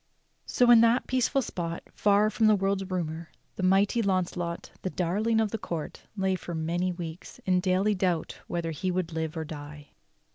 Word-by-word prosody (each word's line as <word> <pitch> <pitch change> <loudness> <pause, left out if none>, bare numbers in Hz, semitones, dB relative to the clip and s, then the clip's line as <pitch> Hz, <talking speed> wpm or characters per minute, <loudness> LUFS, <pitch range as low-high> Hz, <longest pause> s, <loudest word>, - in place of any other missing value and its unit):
So 245 -1 +4
in 230 -1 +8
that 230 +2 +4
peaceful 260 +2 +1
spot, 170 -5 -4
far 210 +1 +3
from 220 +1 +3
the 215 - +6
world's 195 -1 -1
rumor, 165 -3 -3 0.3
the - - -5
mighty 195 +5 +3
Launcelot, 180 -3 -1
the 185 - -2
darling 205 +6 0
of 220 -2 +1
the 225 - -3
court, 165 -5 -6
lay 190 -1 +1
for 180 -2 -5
many 170 +3 -1
weeks 170 -1 -7
in 185 -1 +3
daily 190 +3 +2
doubt 180 -4 -1
whether 170 -1 -2
he 175 +4 -2
would 180 -2 -2
live 160 0 -3
or 160 - -3
die. 150 -1 -9
185 Hz, 180 wpm, -28 LUFS, 170-205 Hz, 0.3 s, in